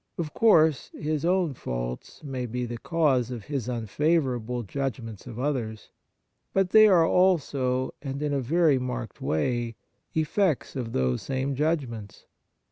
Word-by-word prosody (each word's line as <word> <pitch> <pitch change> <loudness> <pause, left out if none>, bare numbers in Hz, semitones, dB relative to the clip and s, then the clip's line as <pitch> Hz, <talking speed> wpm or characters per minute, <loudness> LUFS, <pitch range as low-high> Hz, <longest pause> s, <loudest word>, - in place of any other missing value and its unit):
Of 155 -4 -3
course 160 -10 +4
his 155 0 -2
own 175 -3 +2
faults - - -5
may 130 -4 -4
be 125 +2 -3
the 120 -1 -6
cause 140 -8 +1
of 120 -4 -6
his 130 -1 -3
unfavourable 125 - 0
judgments 115 -2 -4
of 115 -2 -8
others; 120 -6 -3 0.6
but 195 -1 +2
they 215 0 +8
are 175 -5 +5
also, 140 -9 +2
and 140 -1 -4
in 145 -1 0
a 140 - +1
very 150 +1 +3
marked 125 - -5
way, 120 +8 -1 0.4
effects 160 0 +1
of 120 -4 -4
those 65 -1 +1
same 135 +1 -2
judgments. 135 -8 -2
135 Hz, 140 wpm, -27 LUFS, 120-155 Hz, 0.6 s, they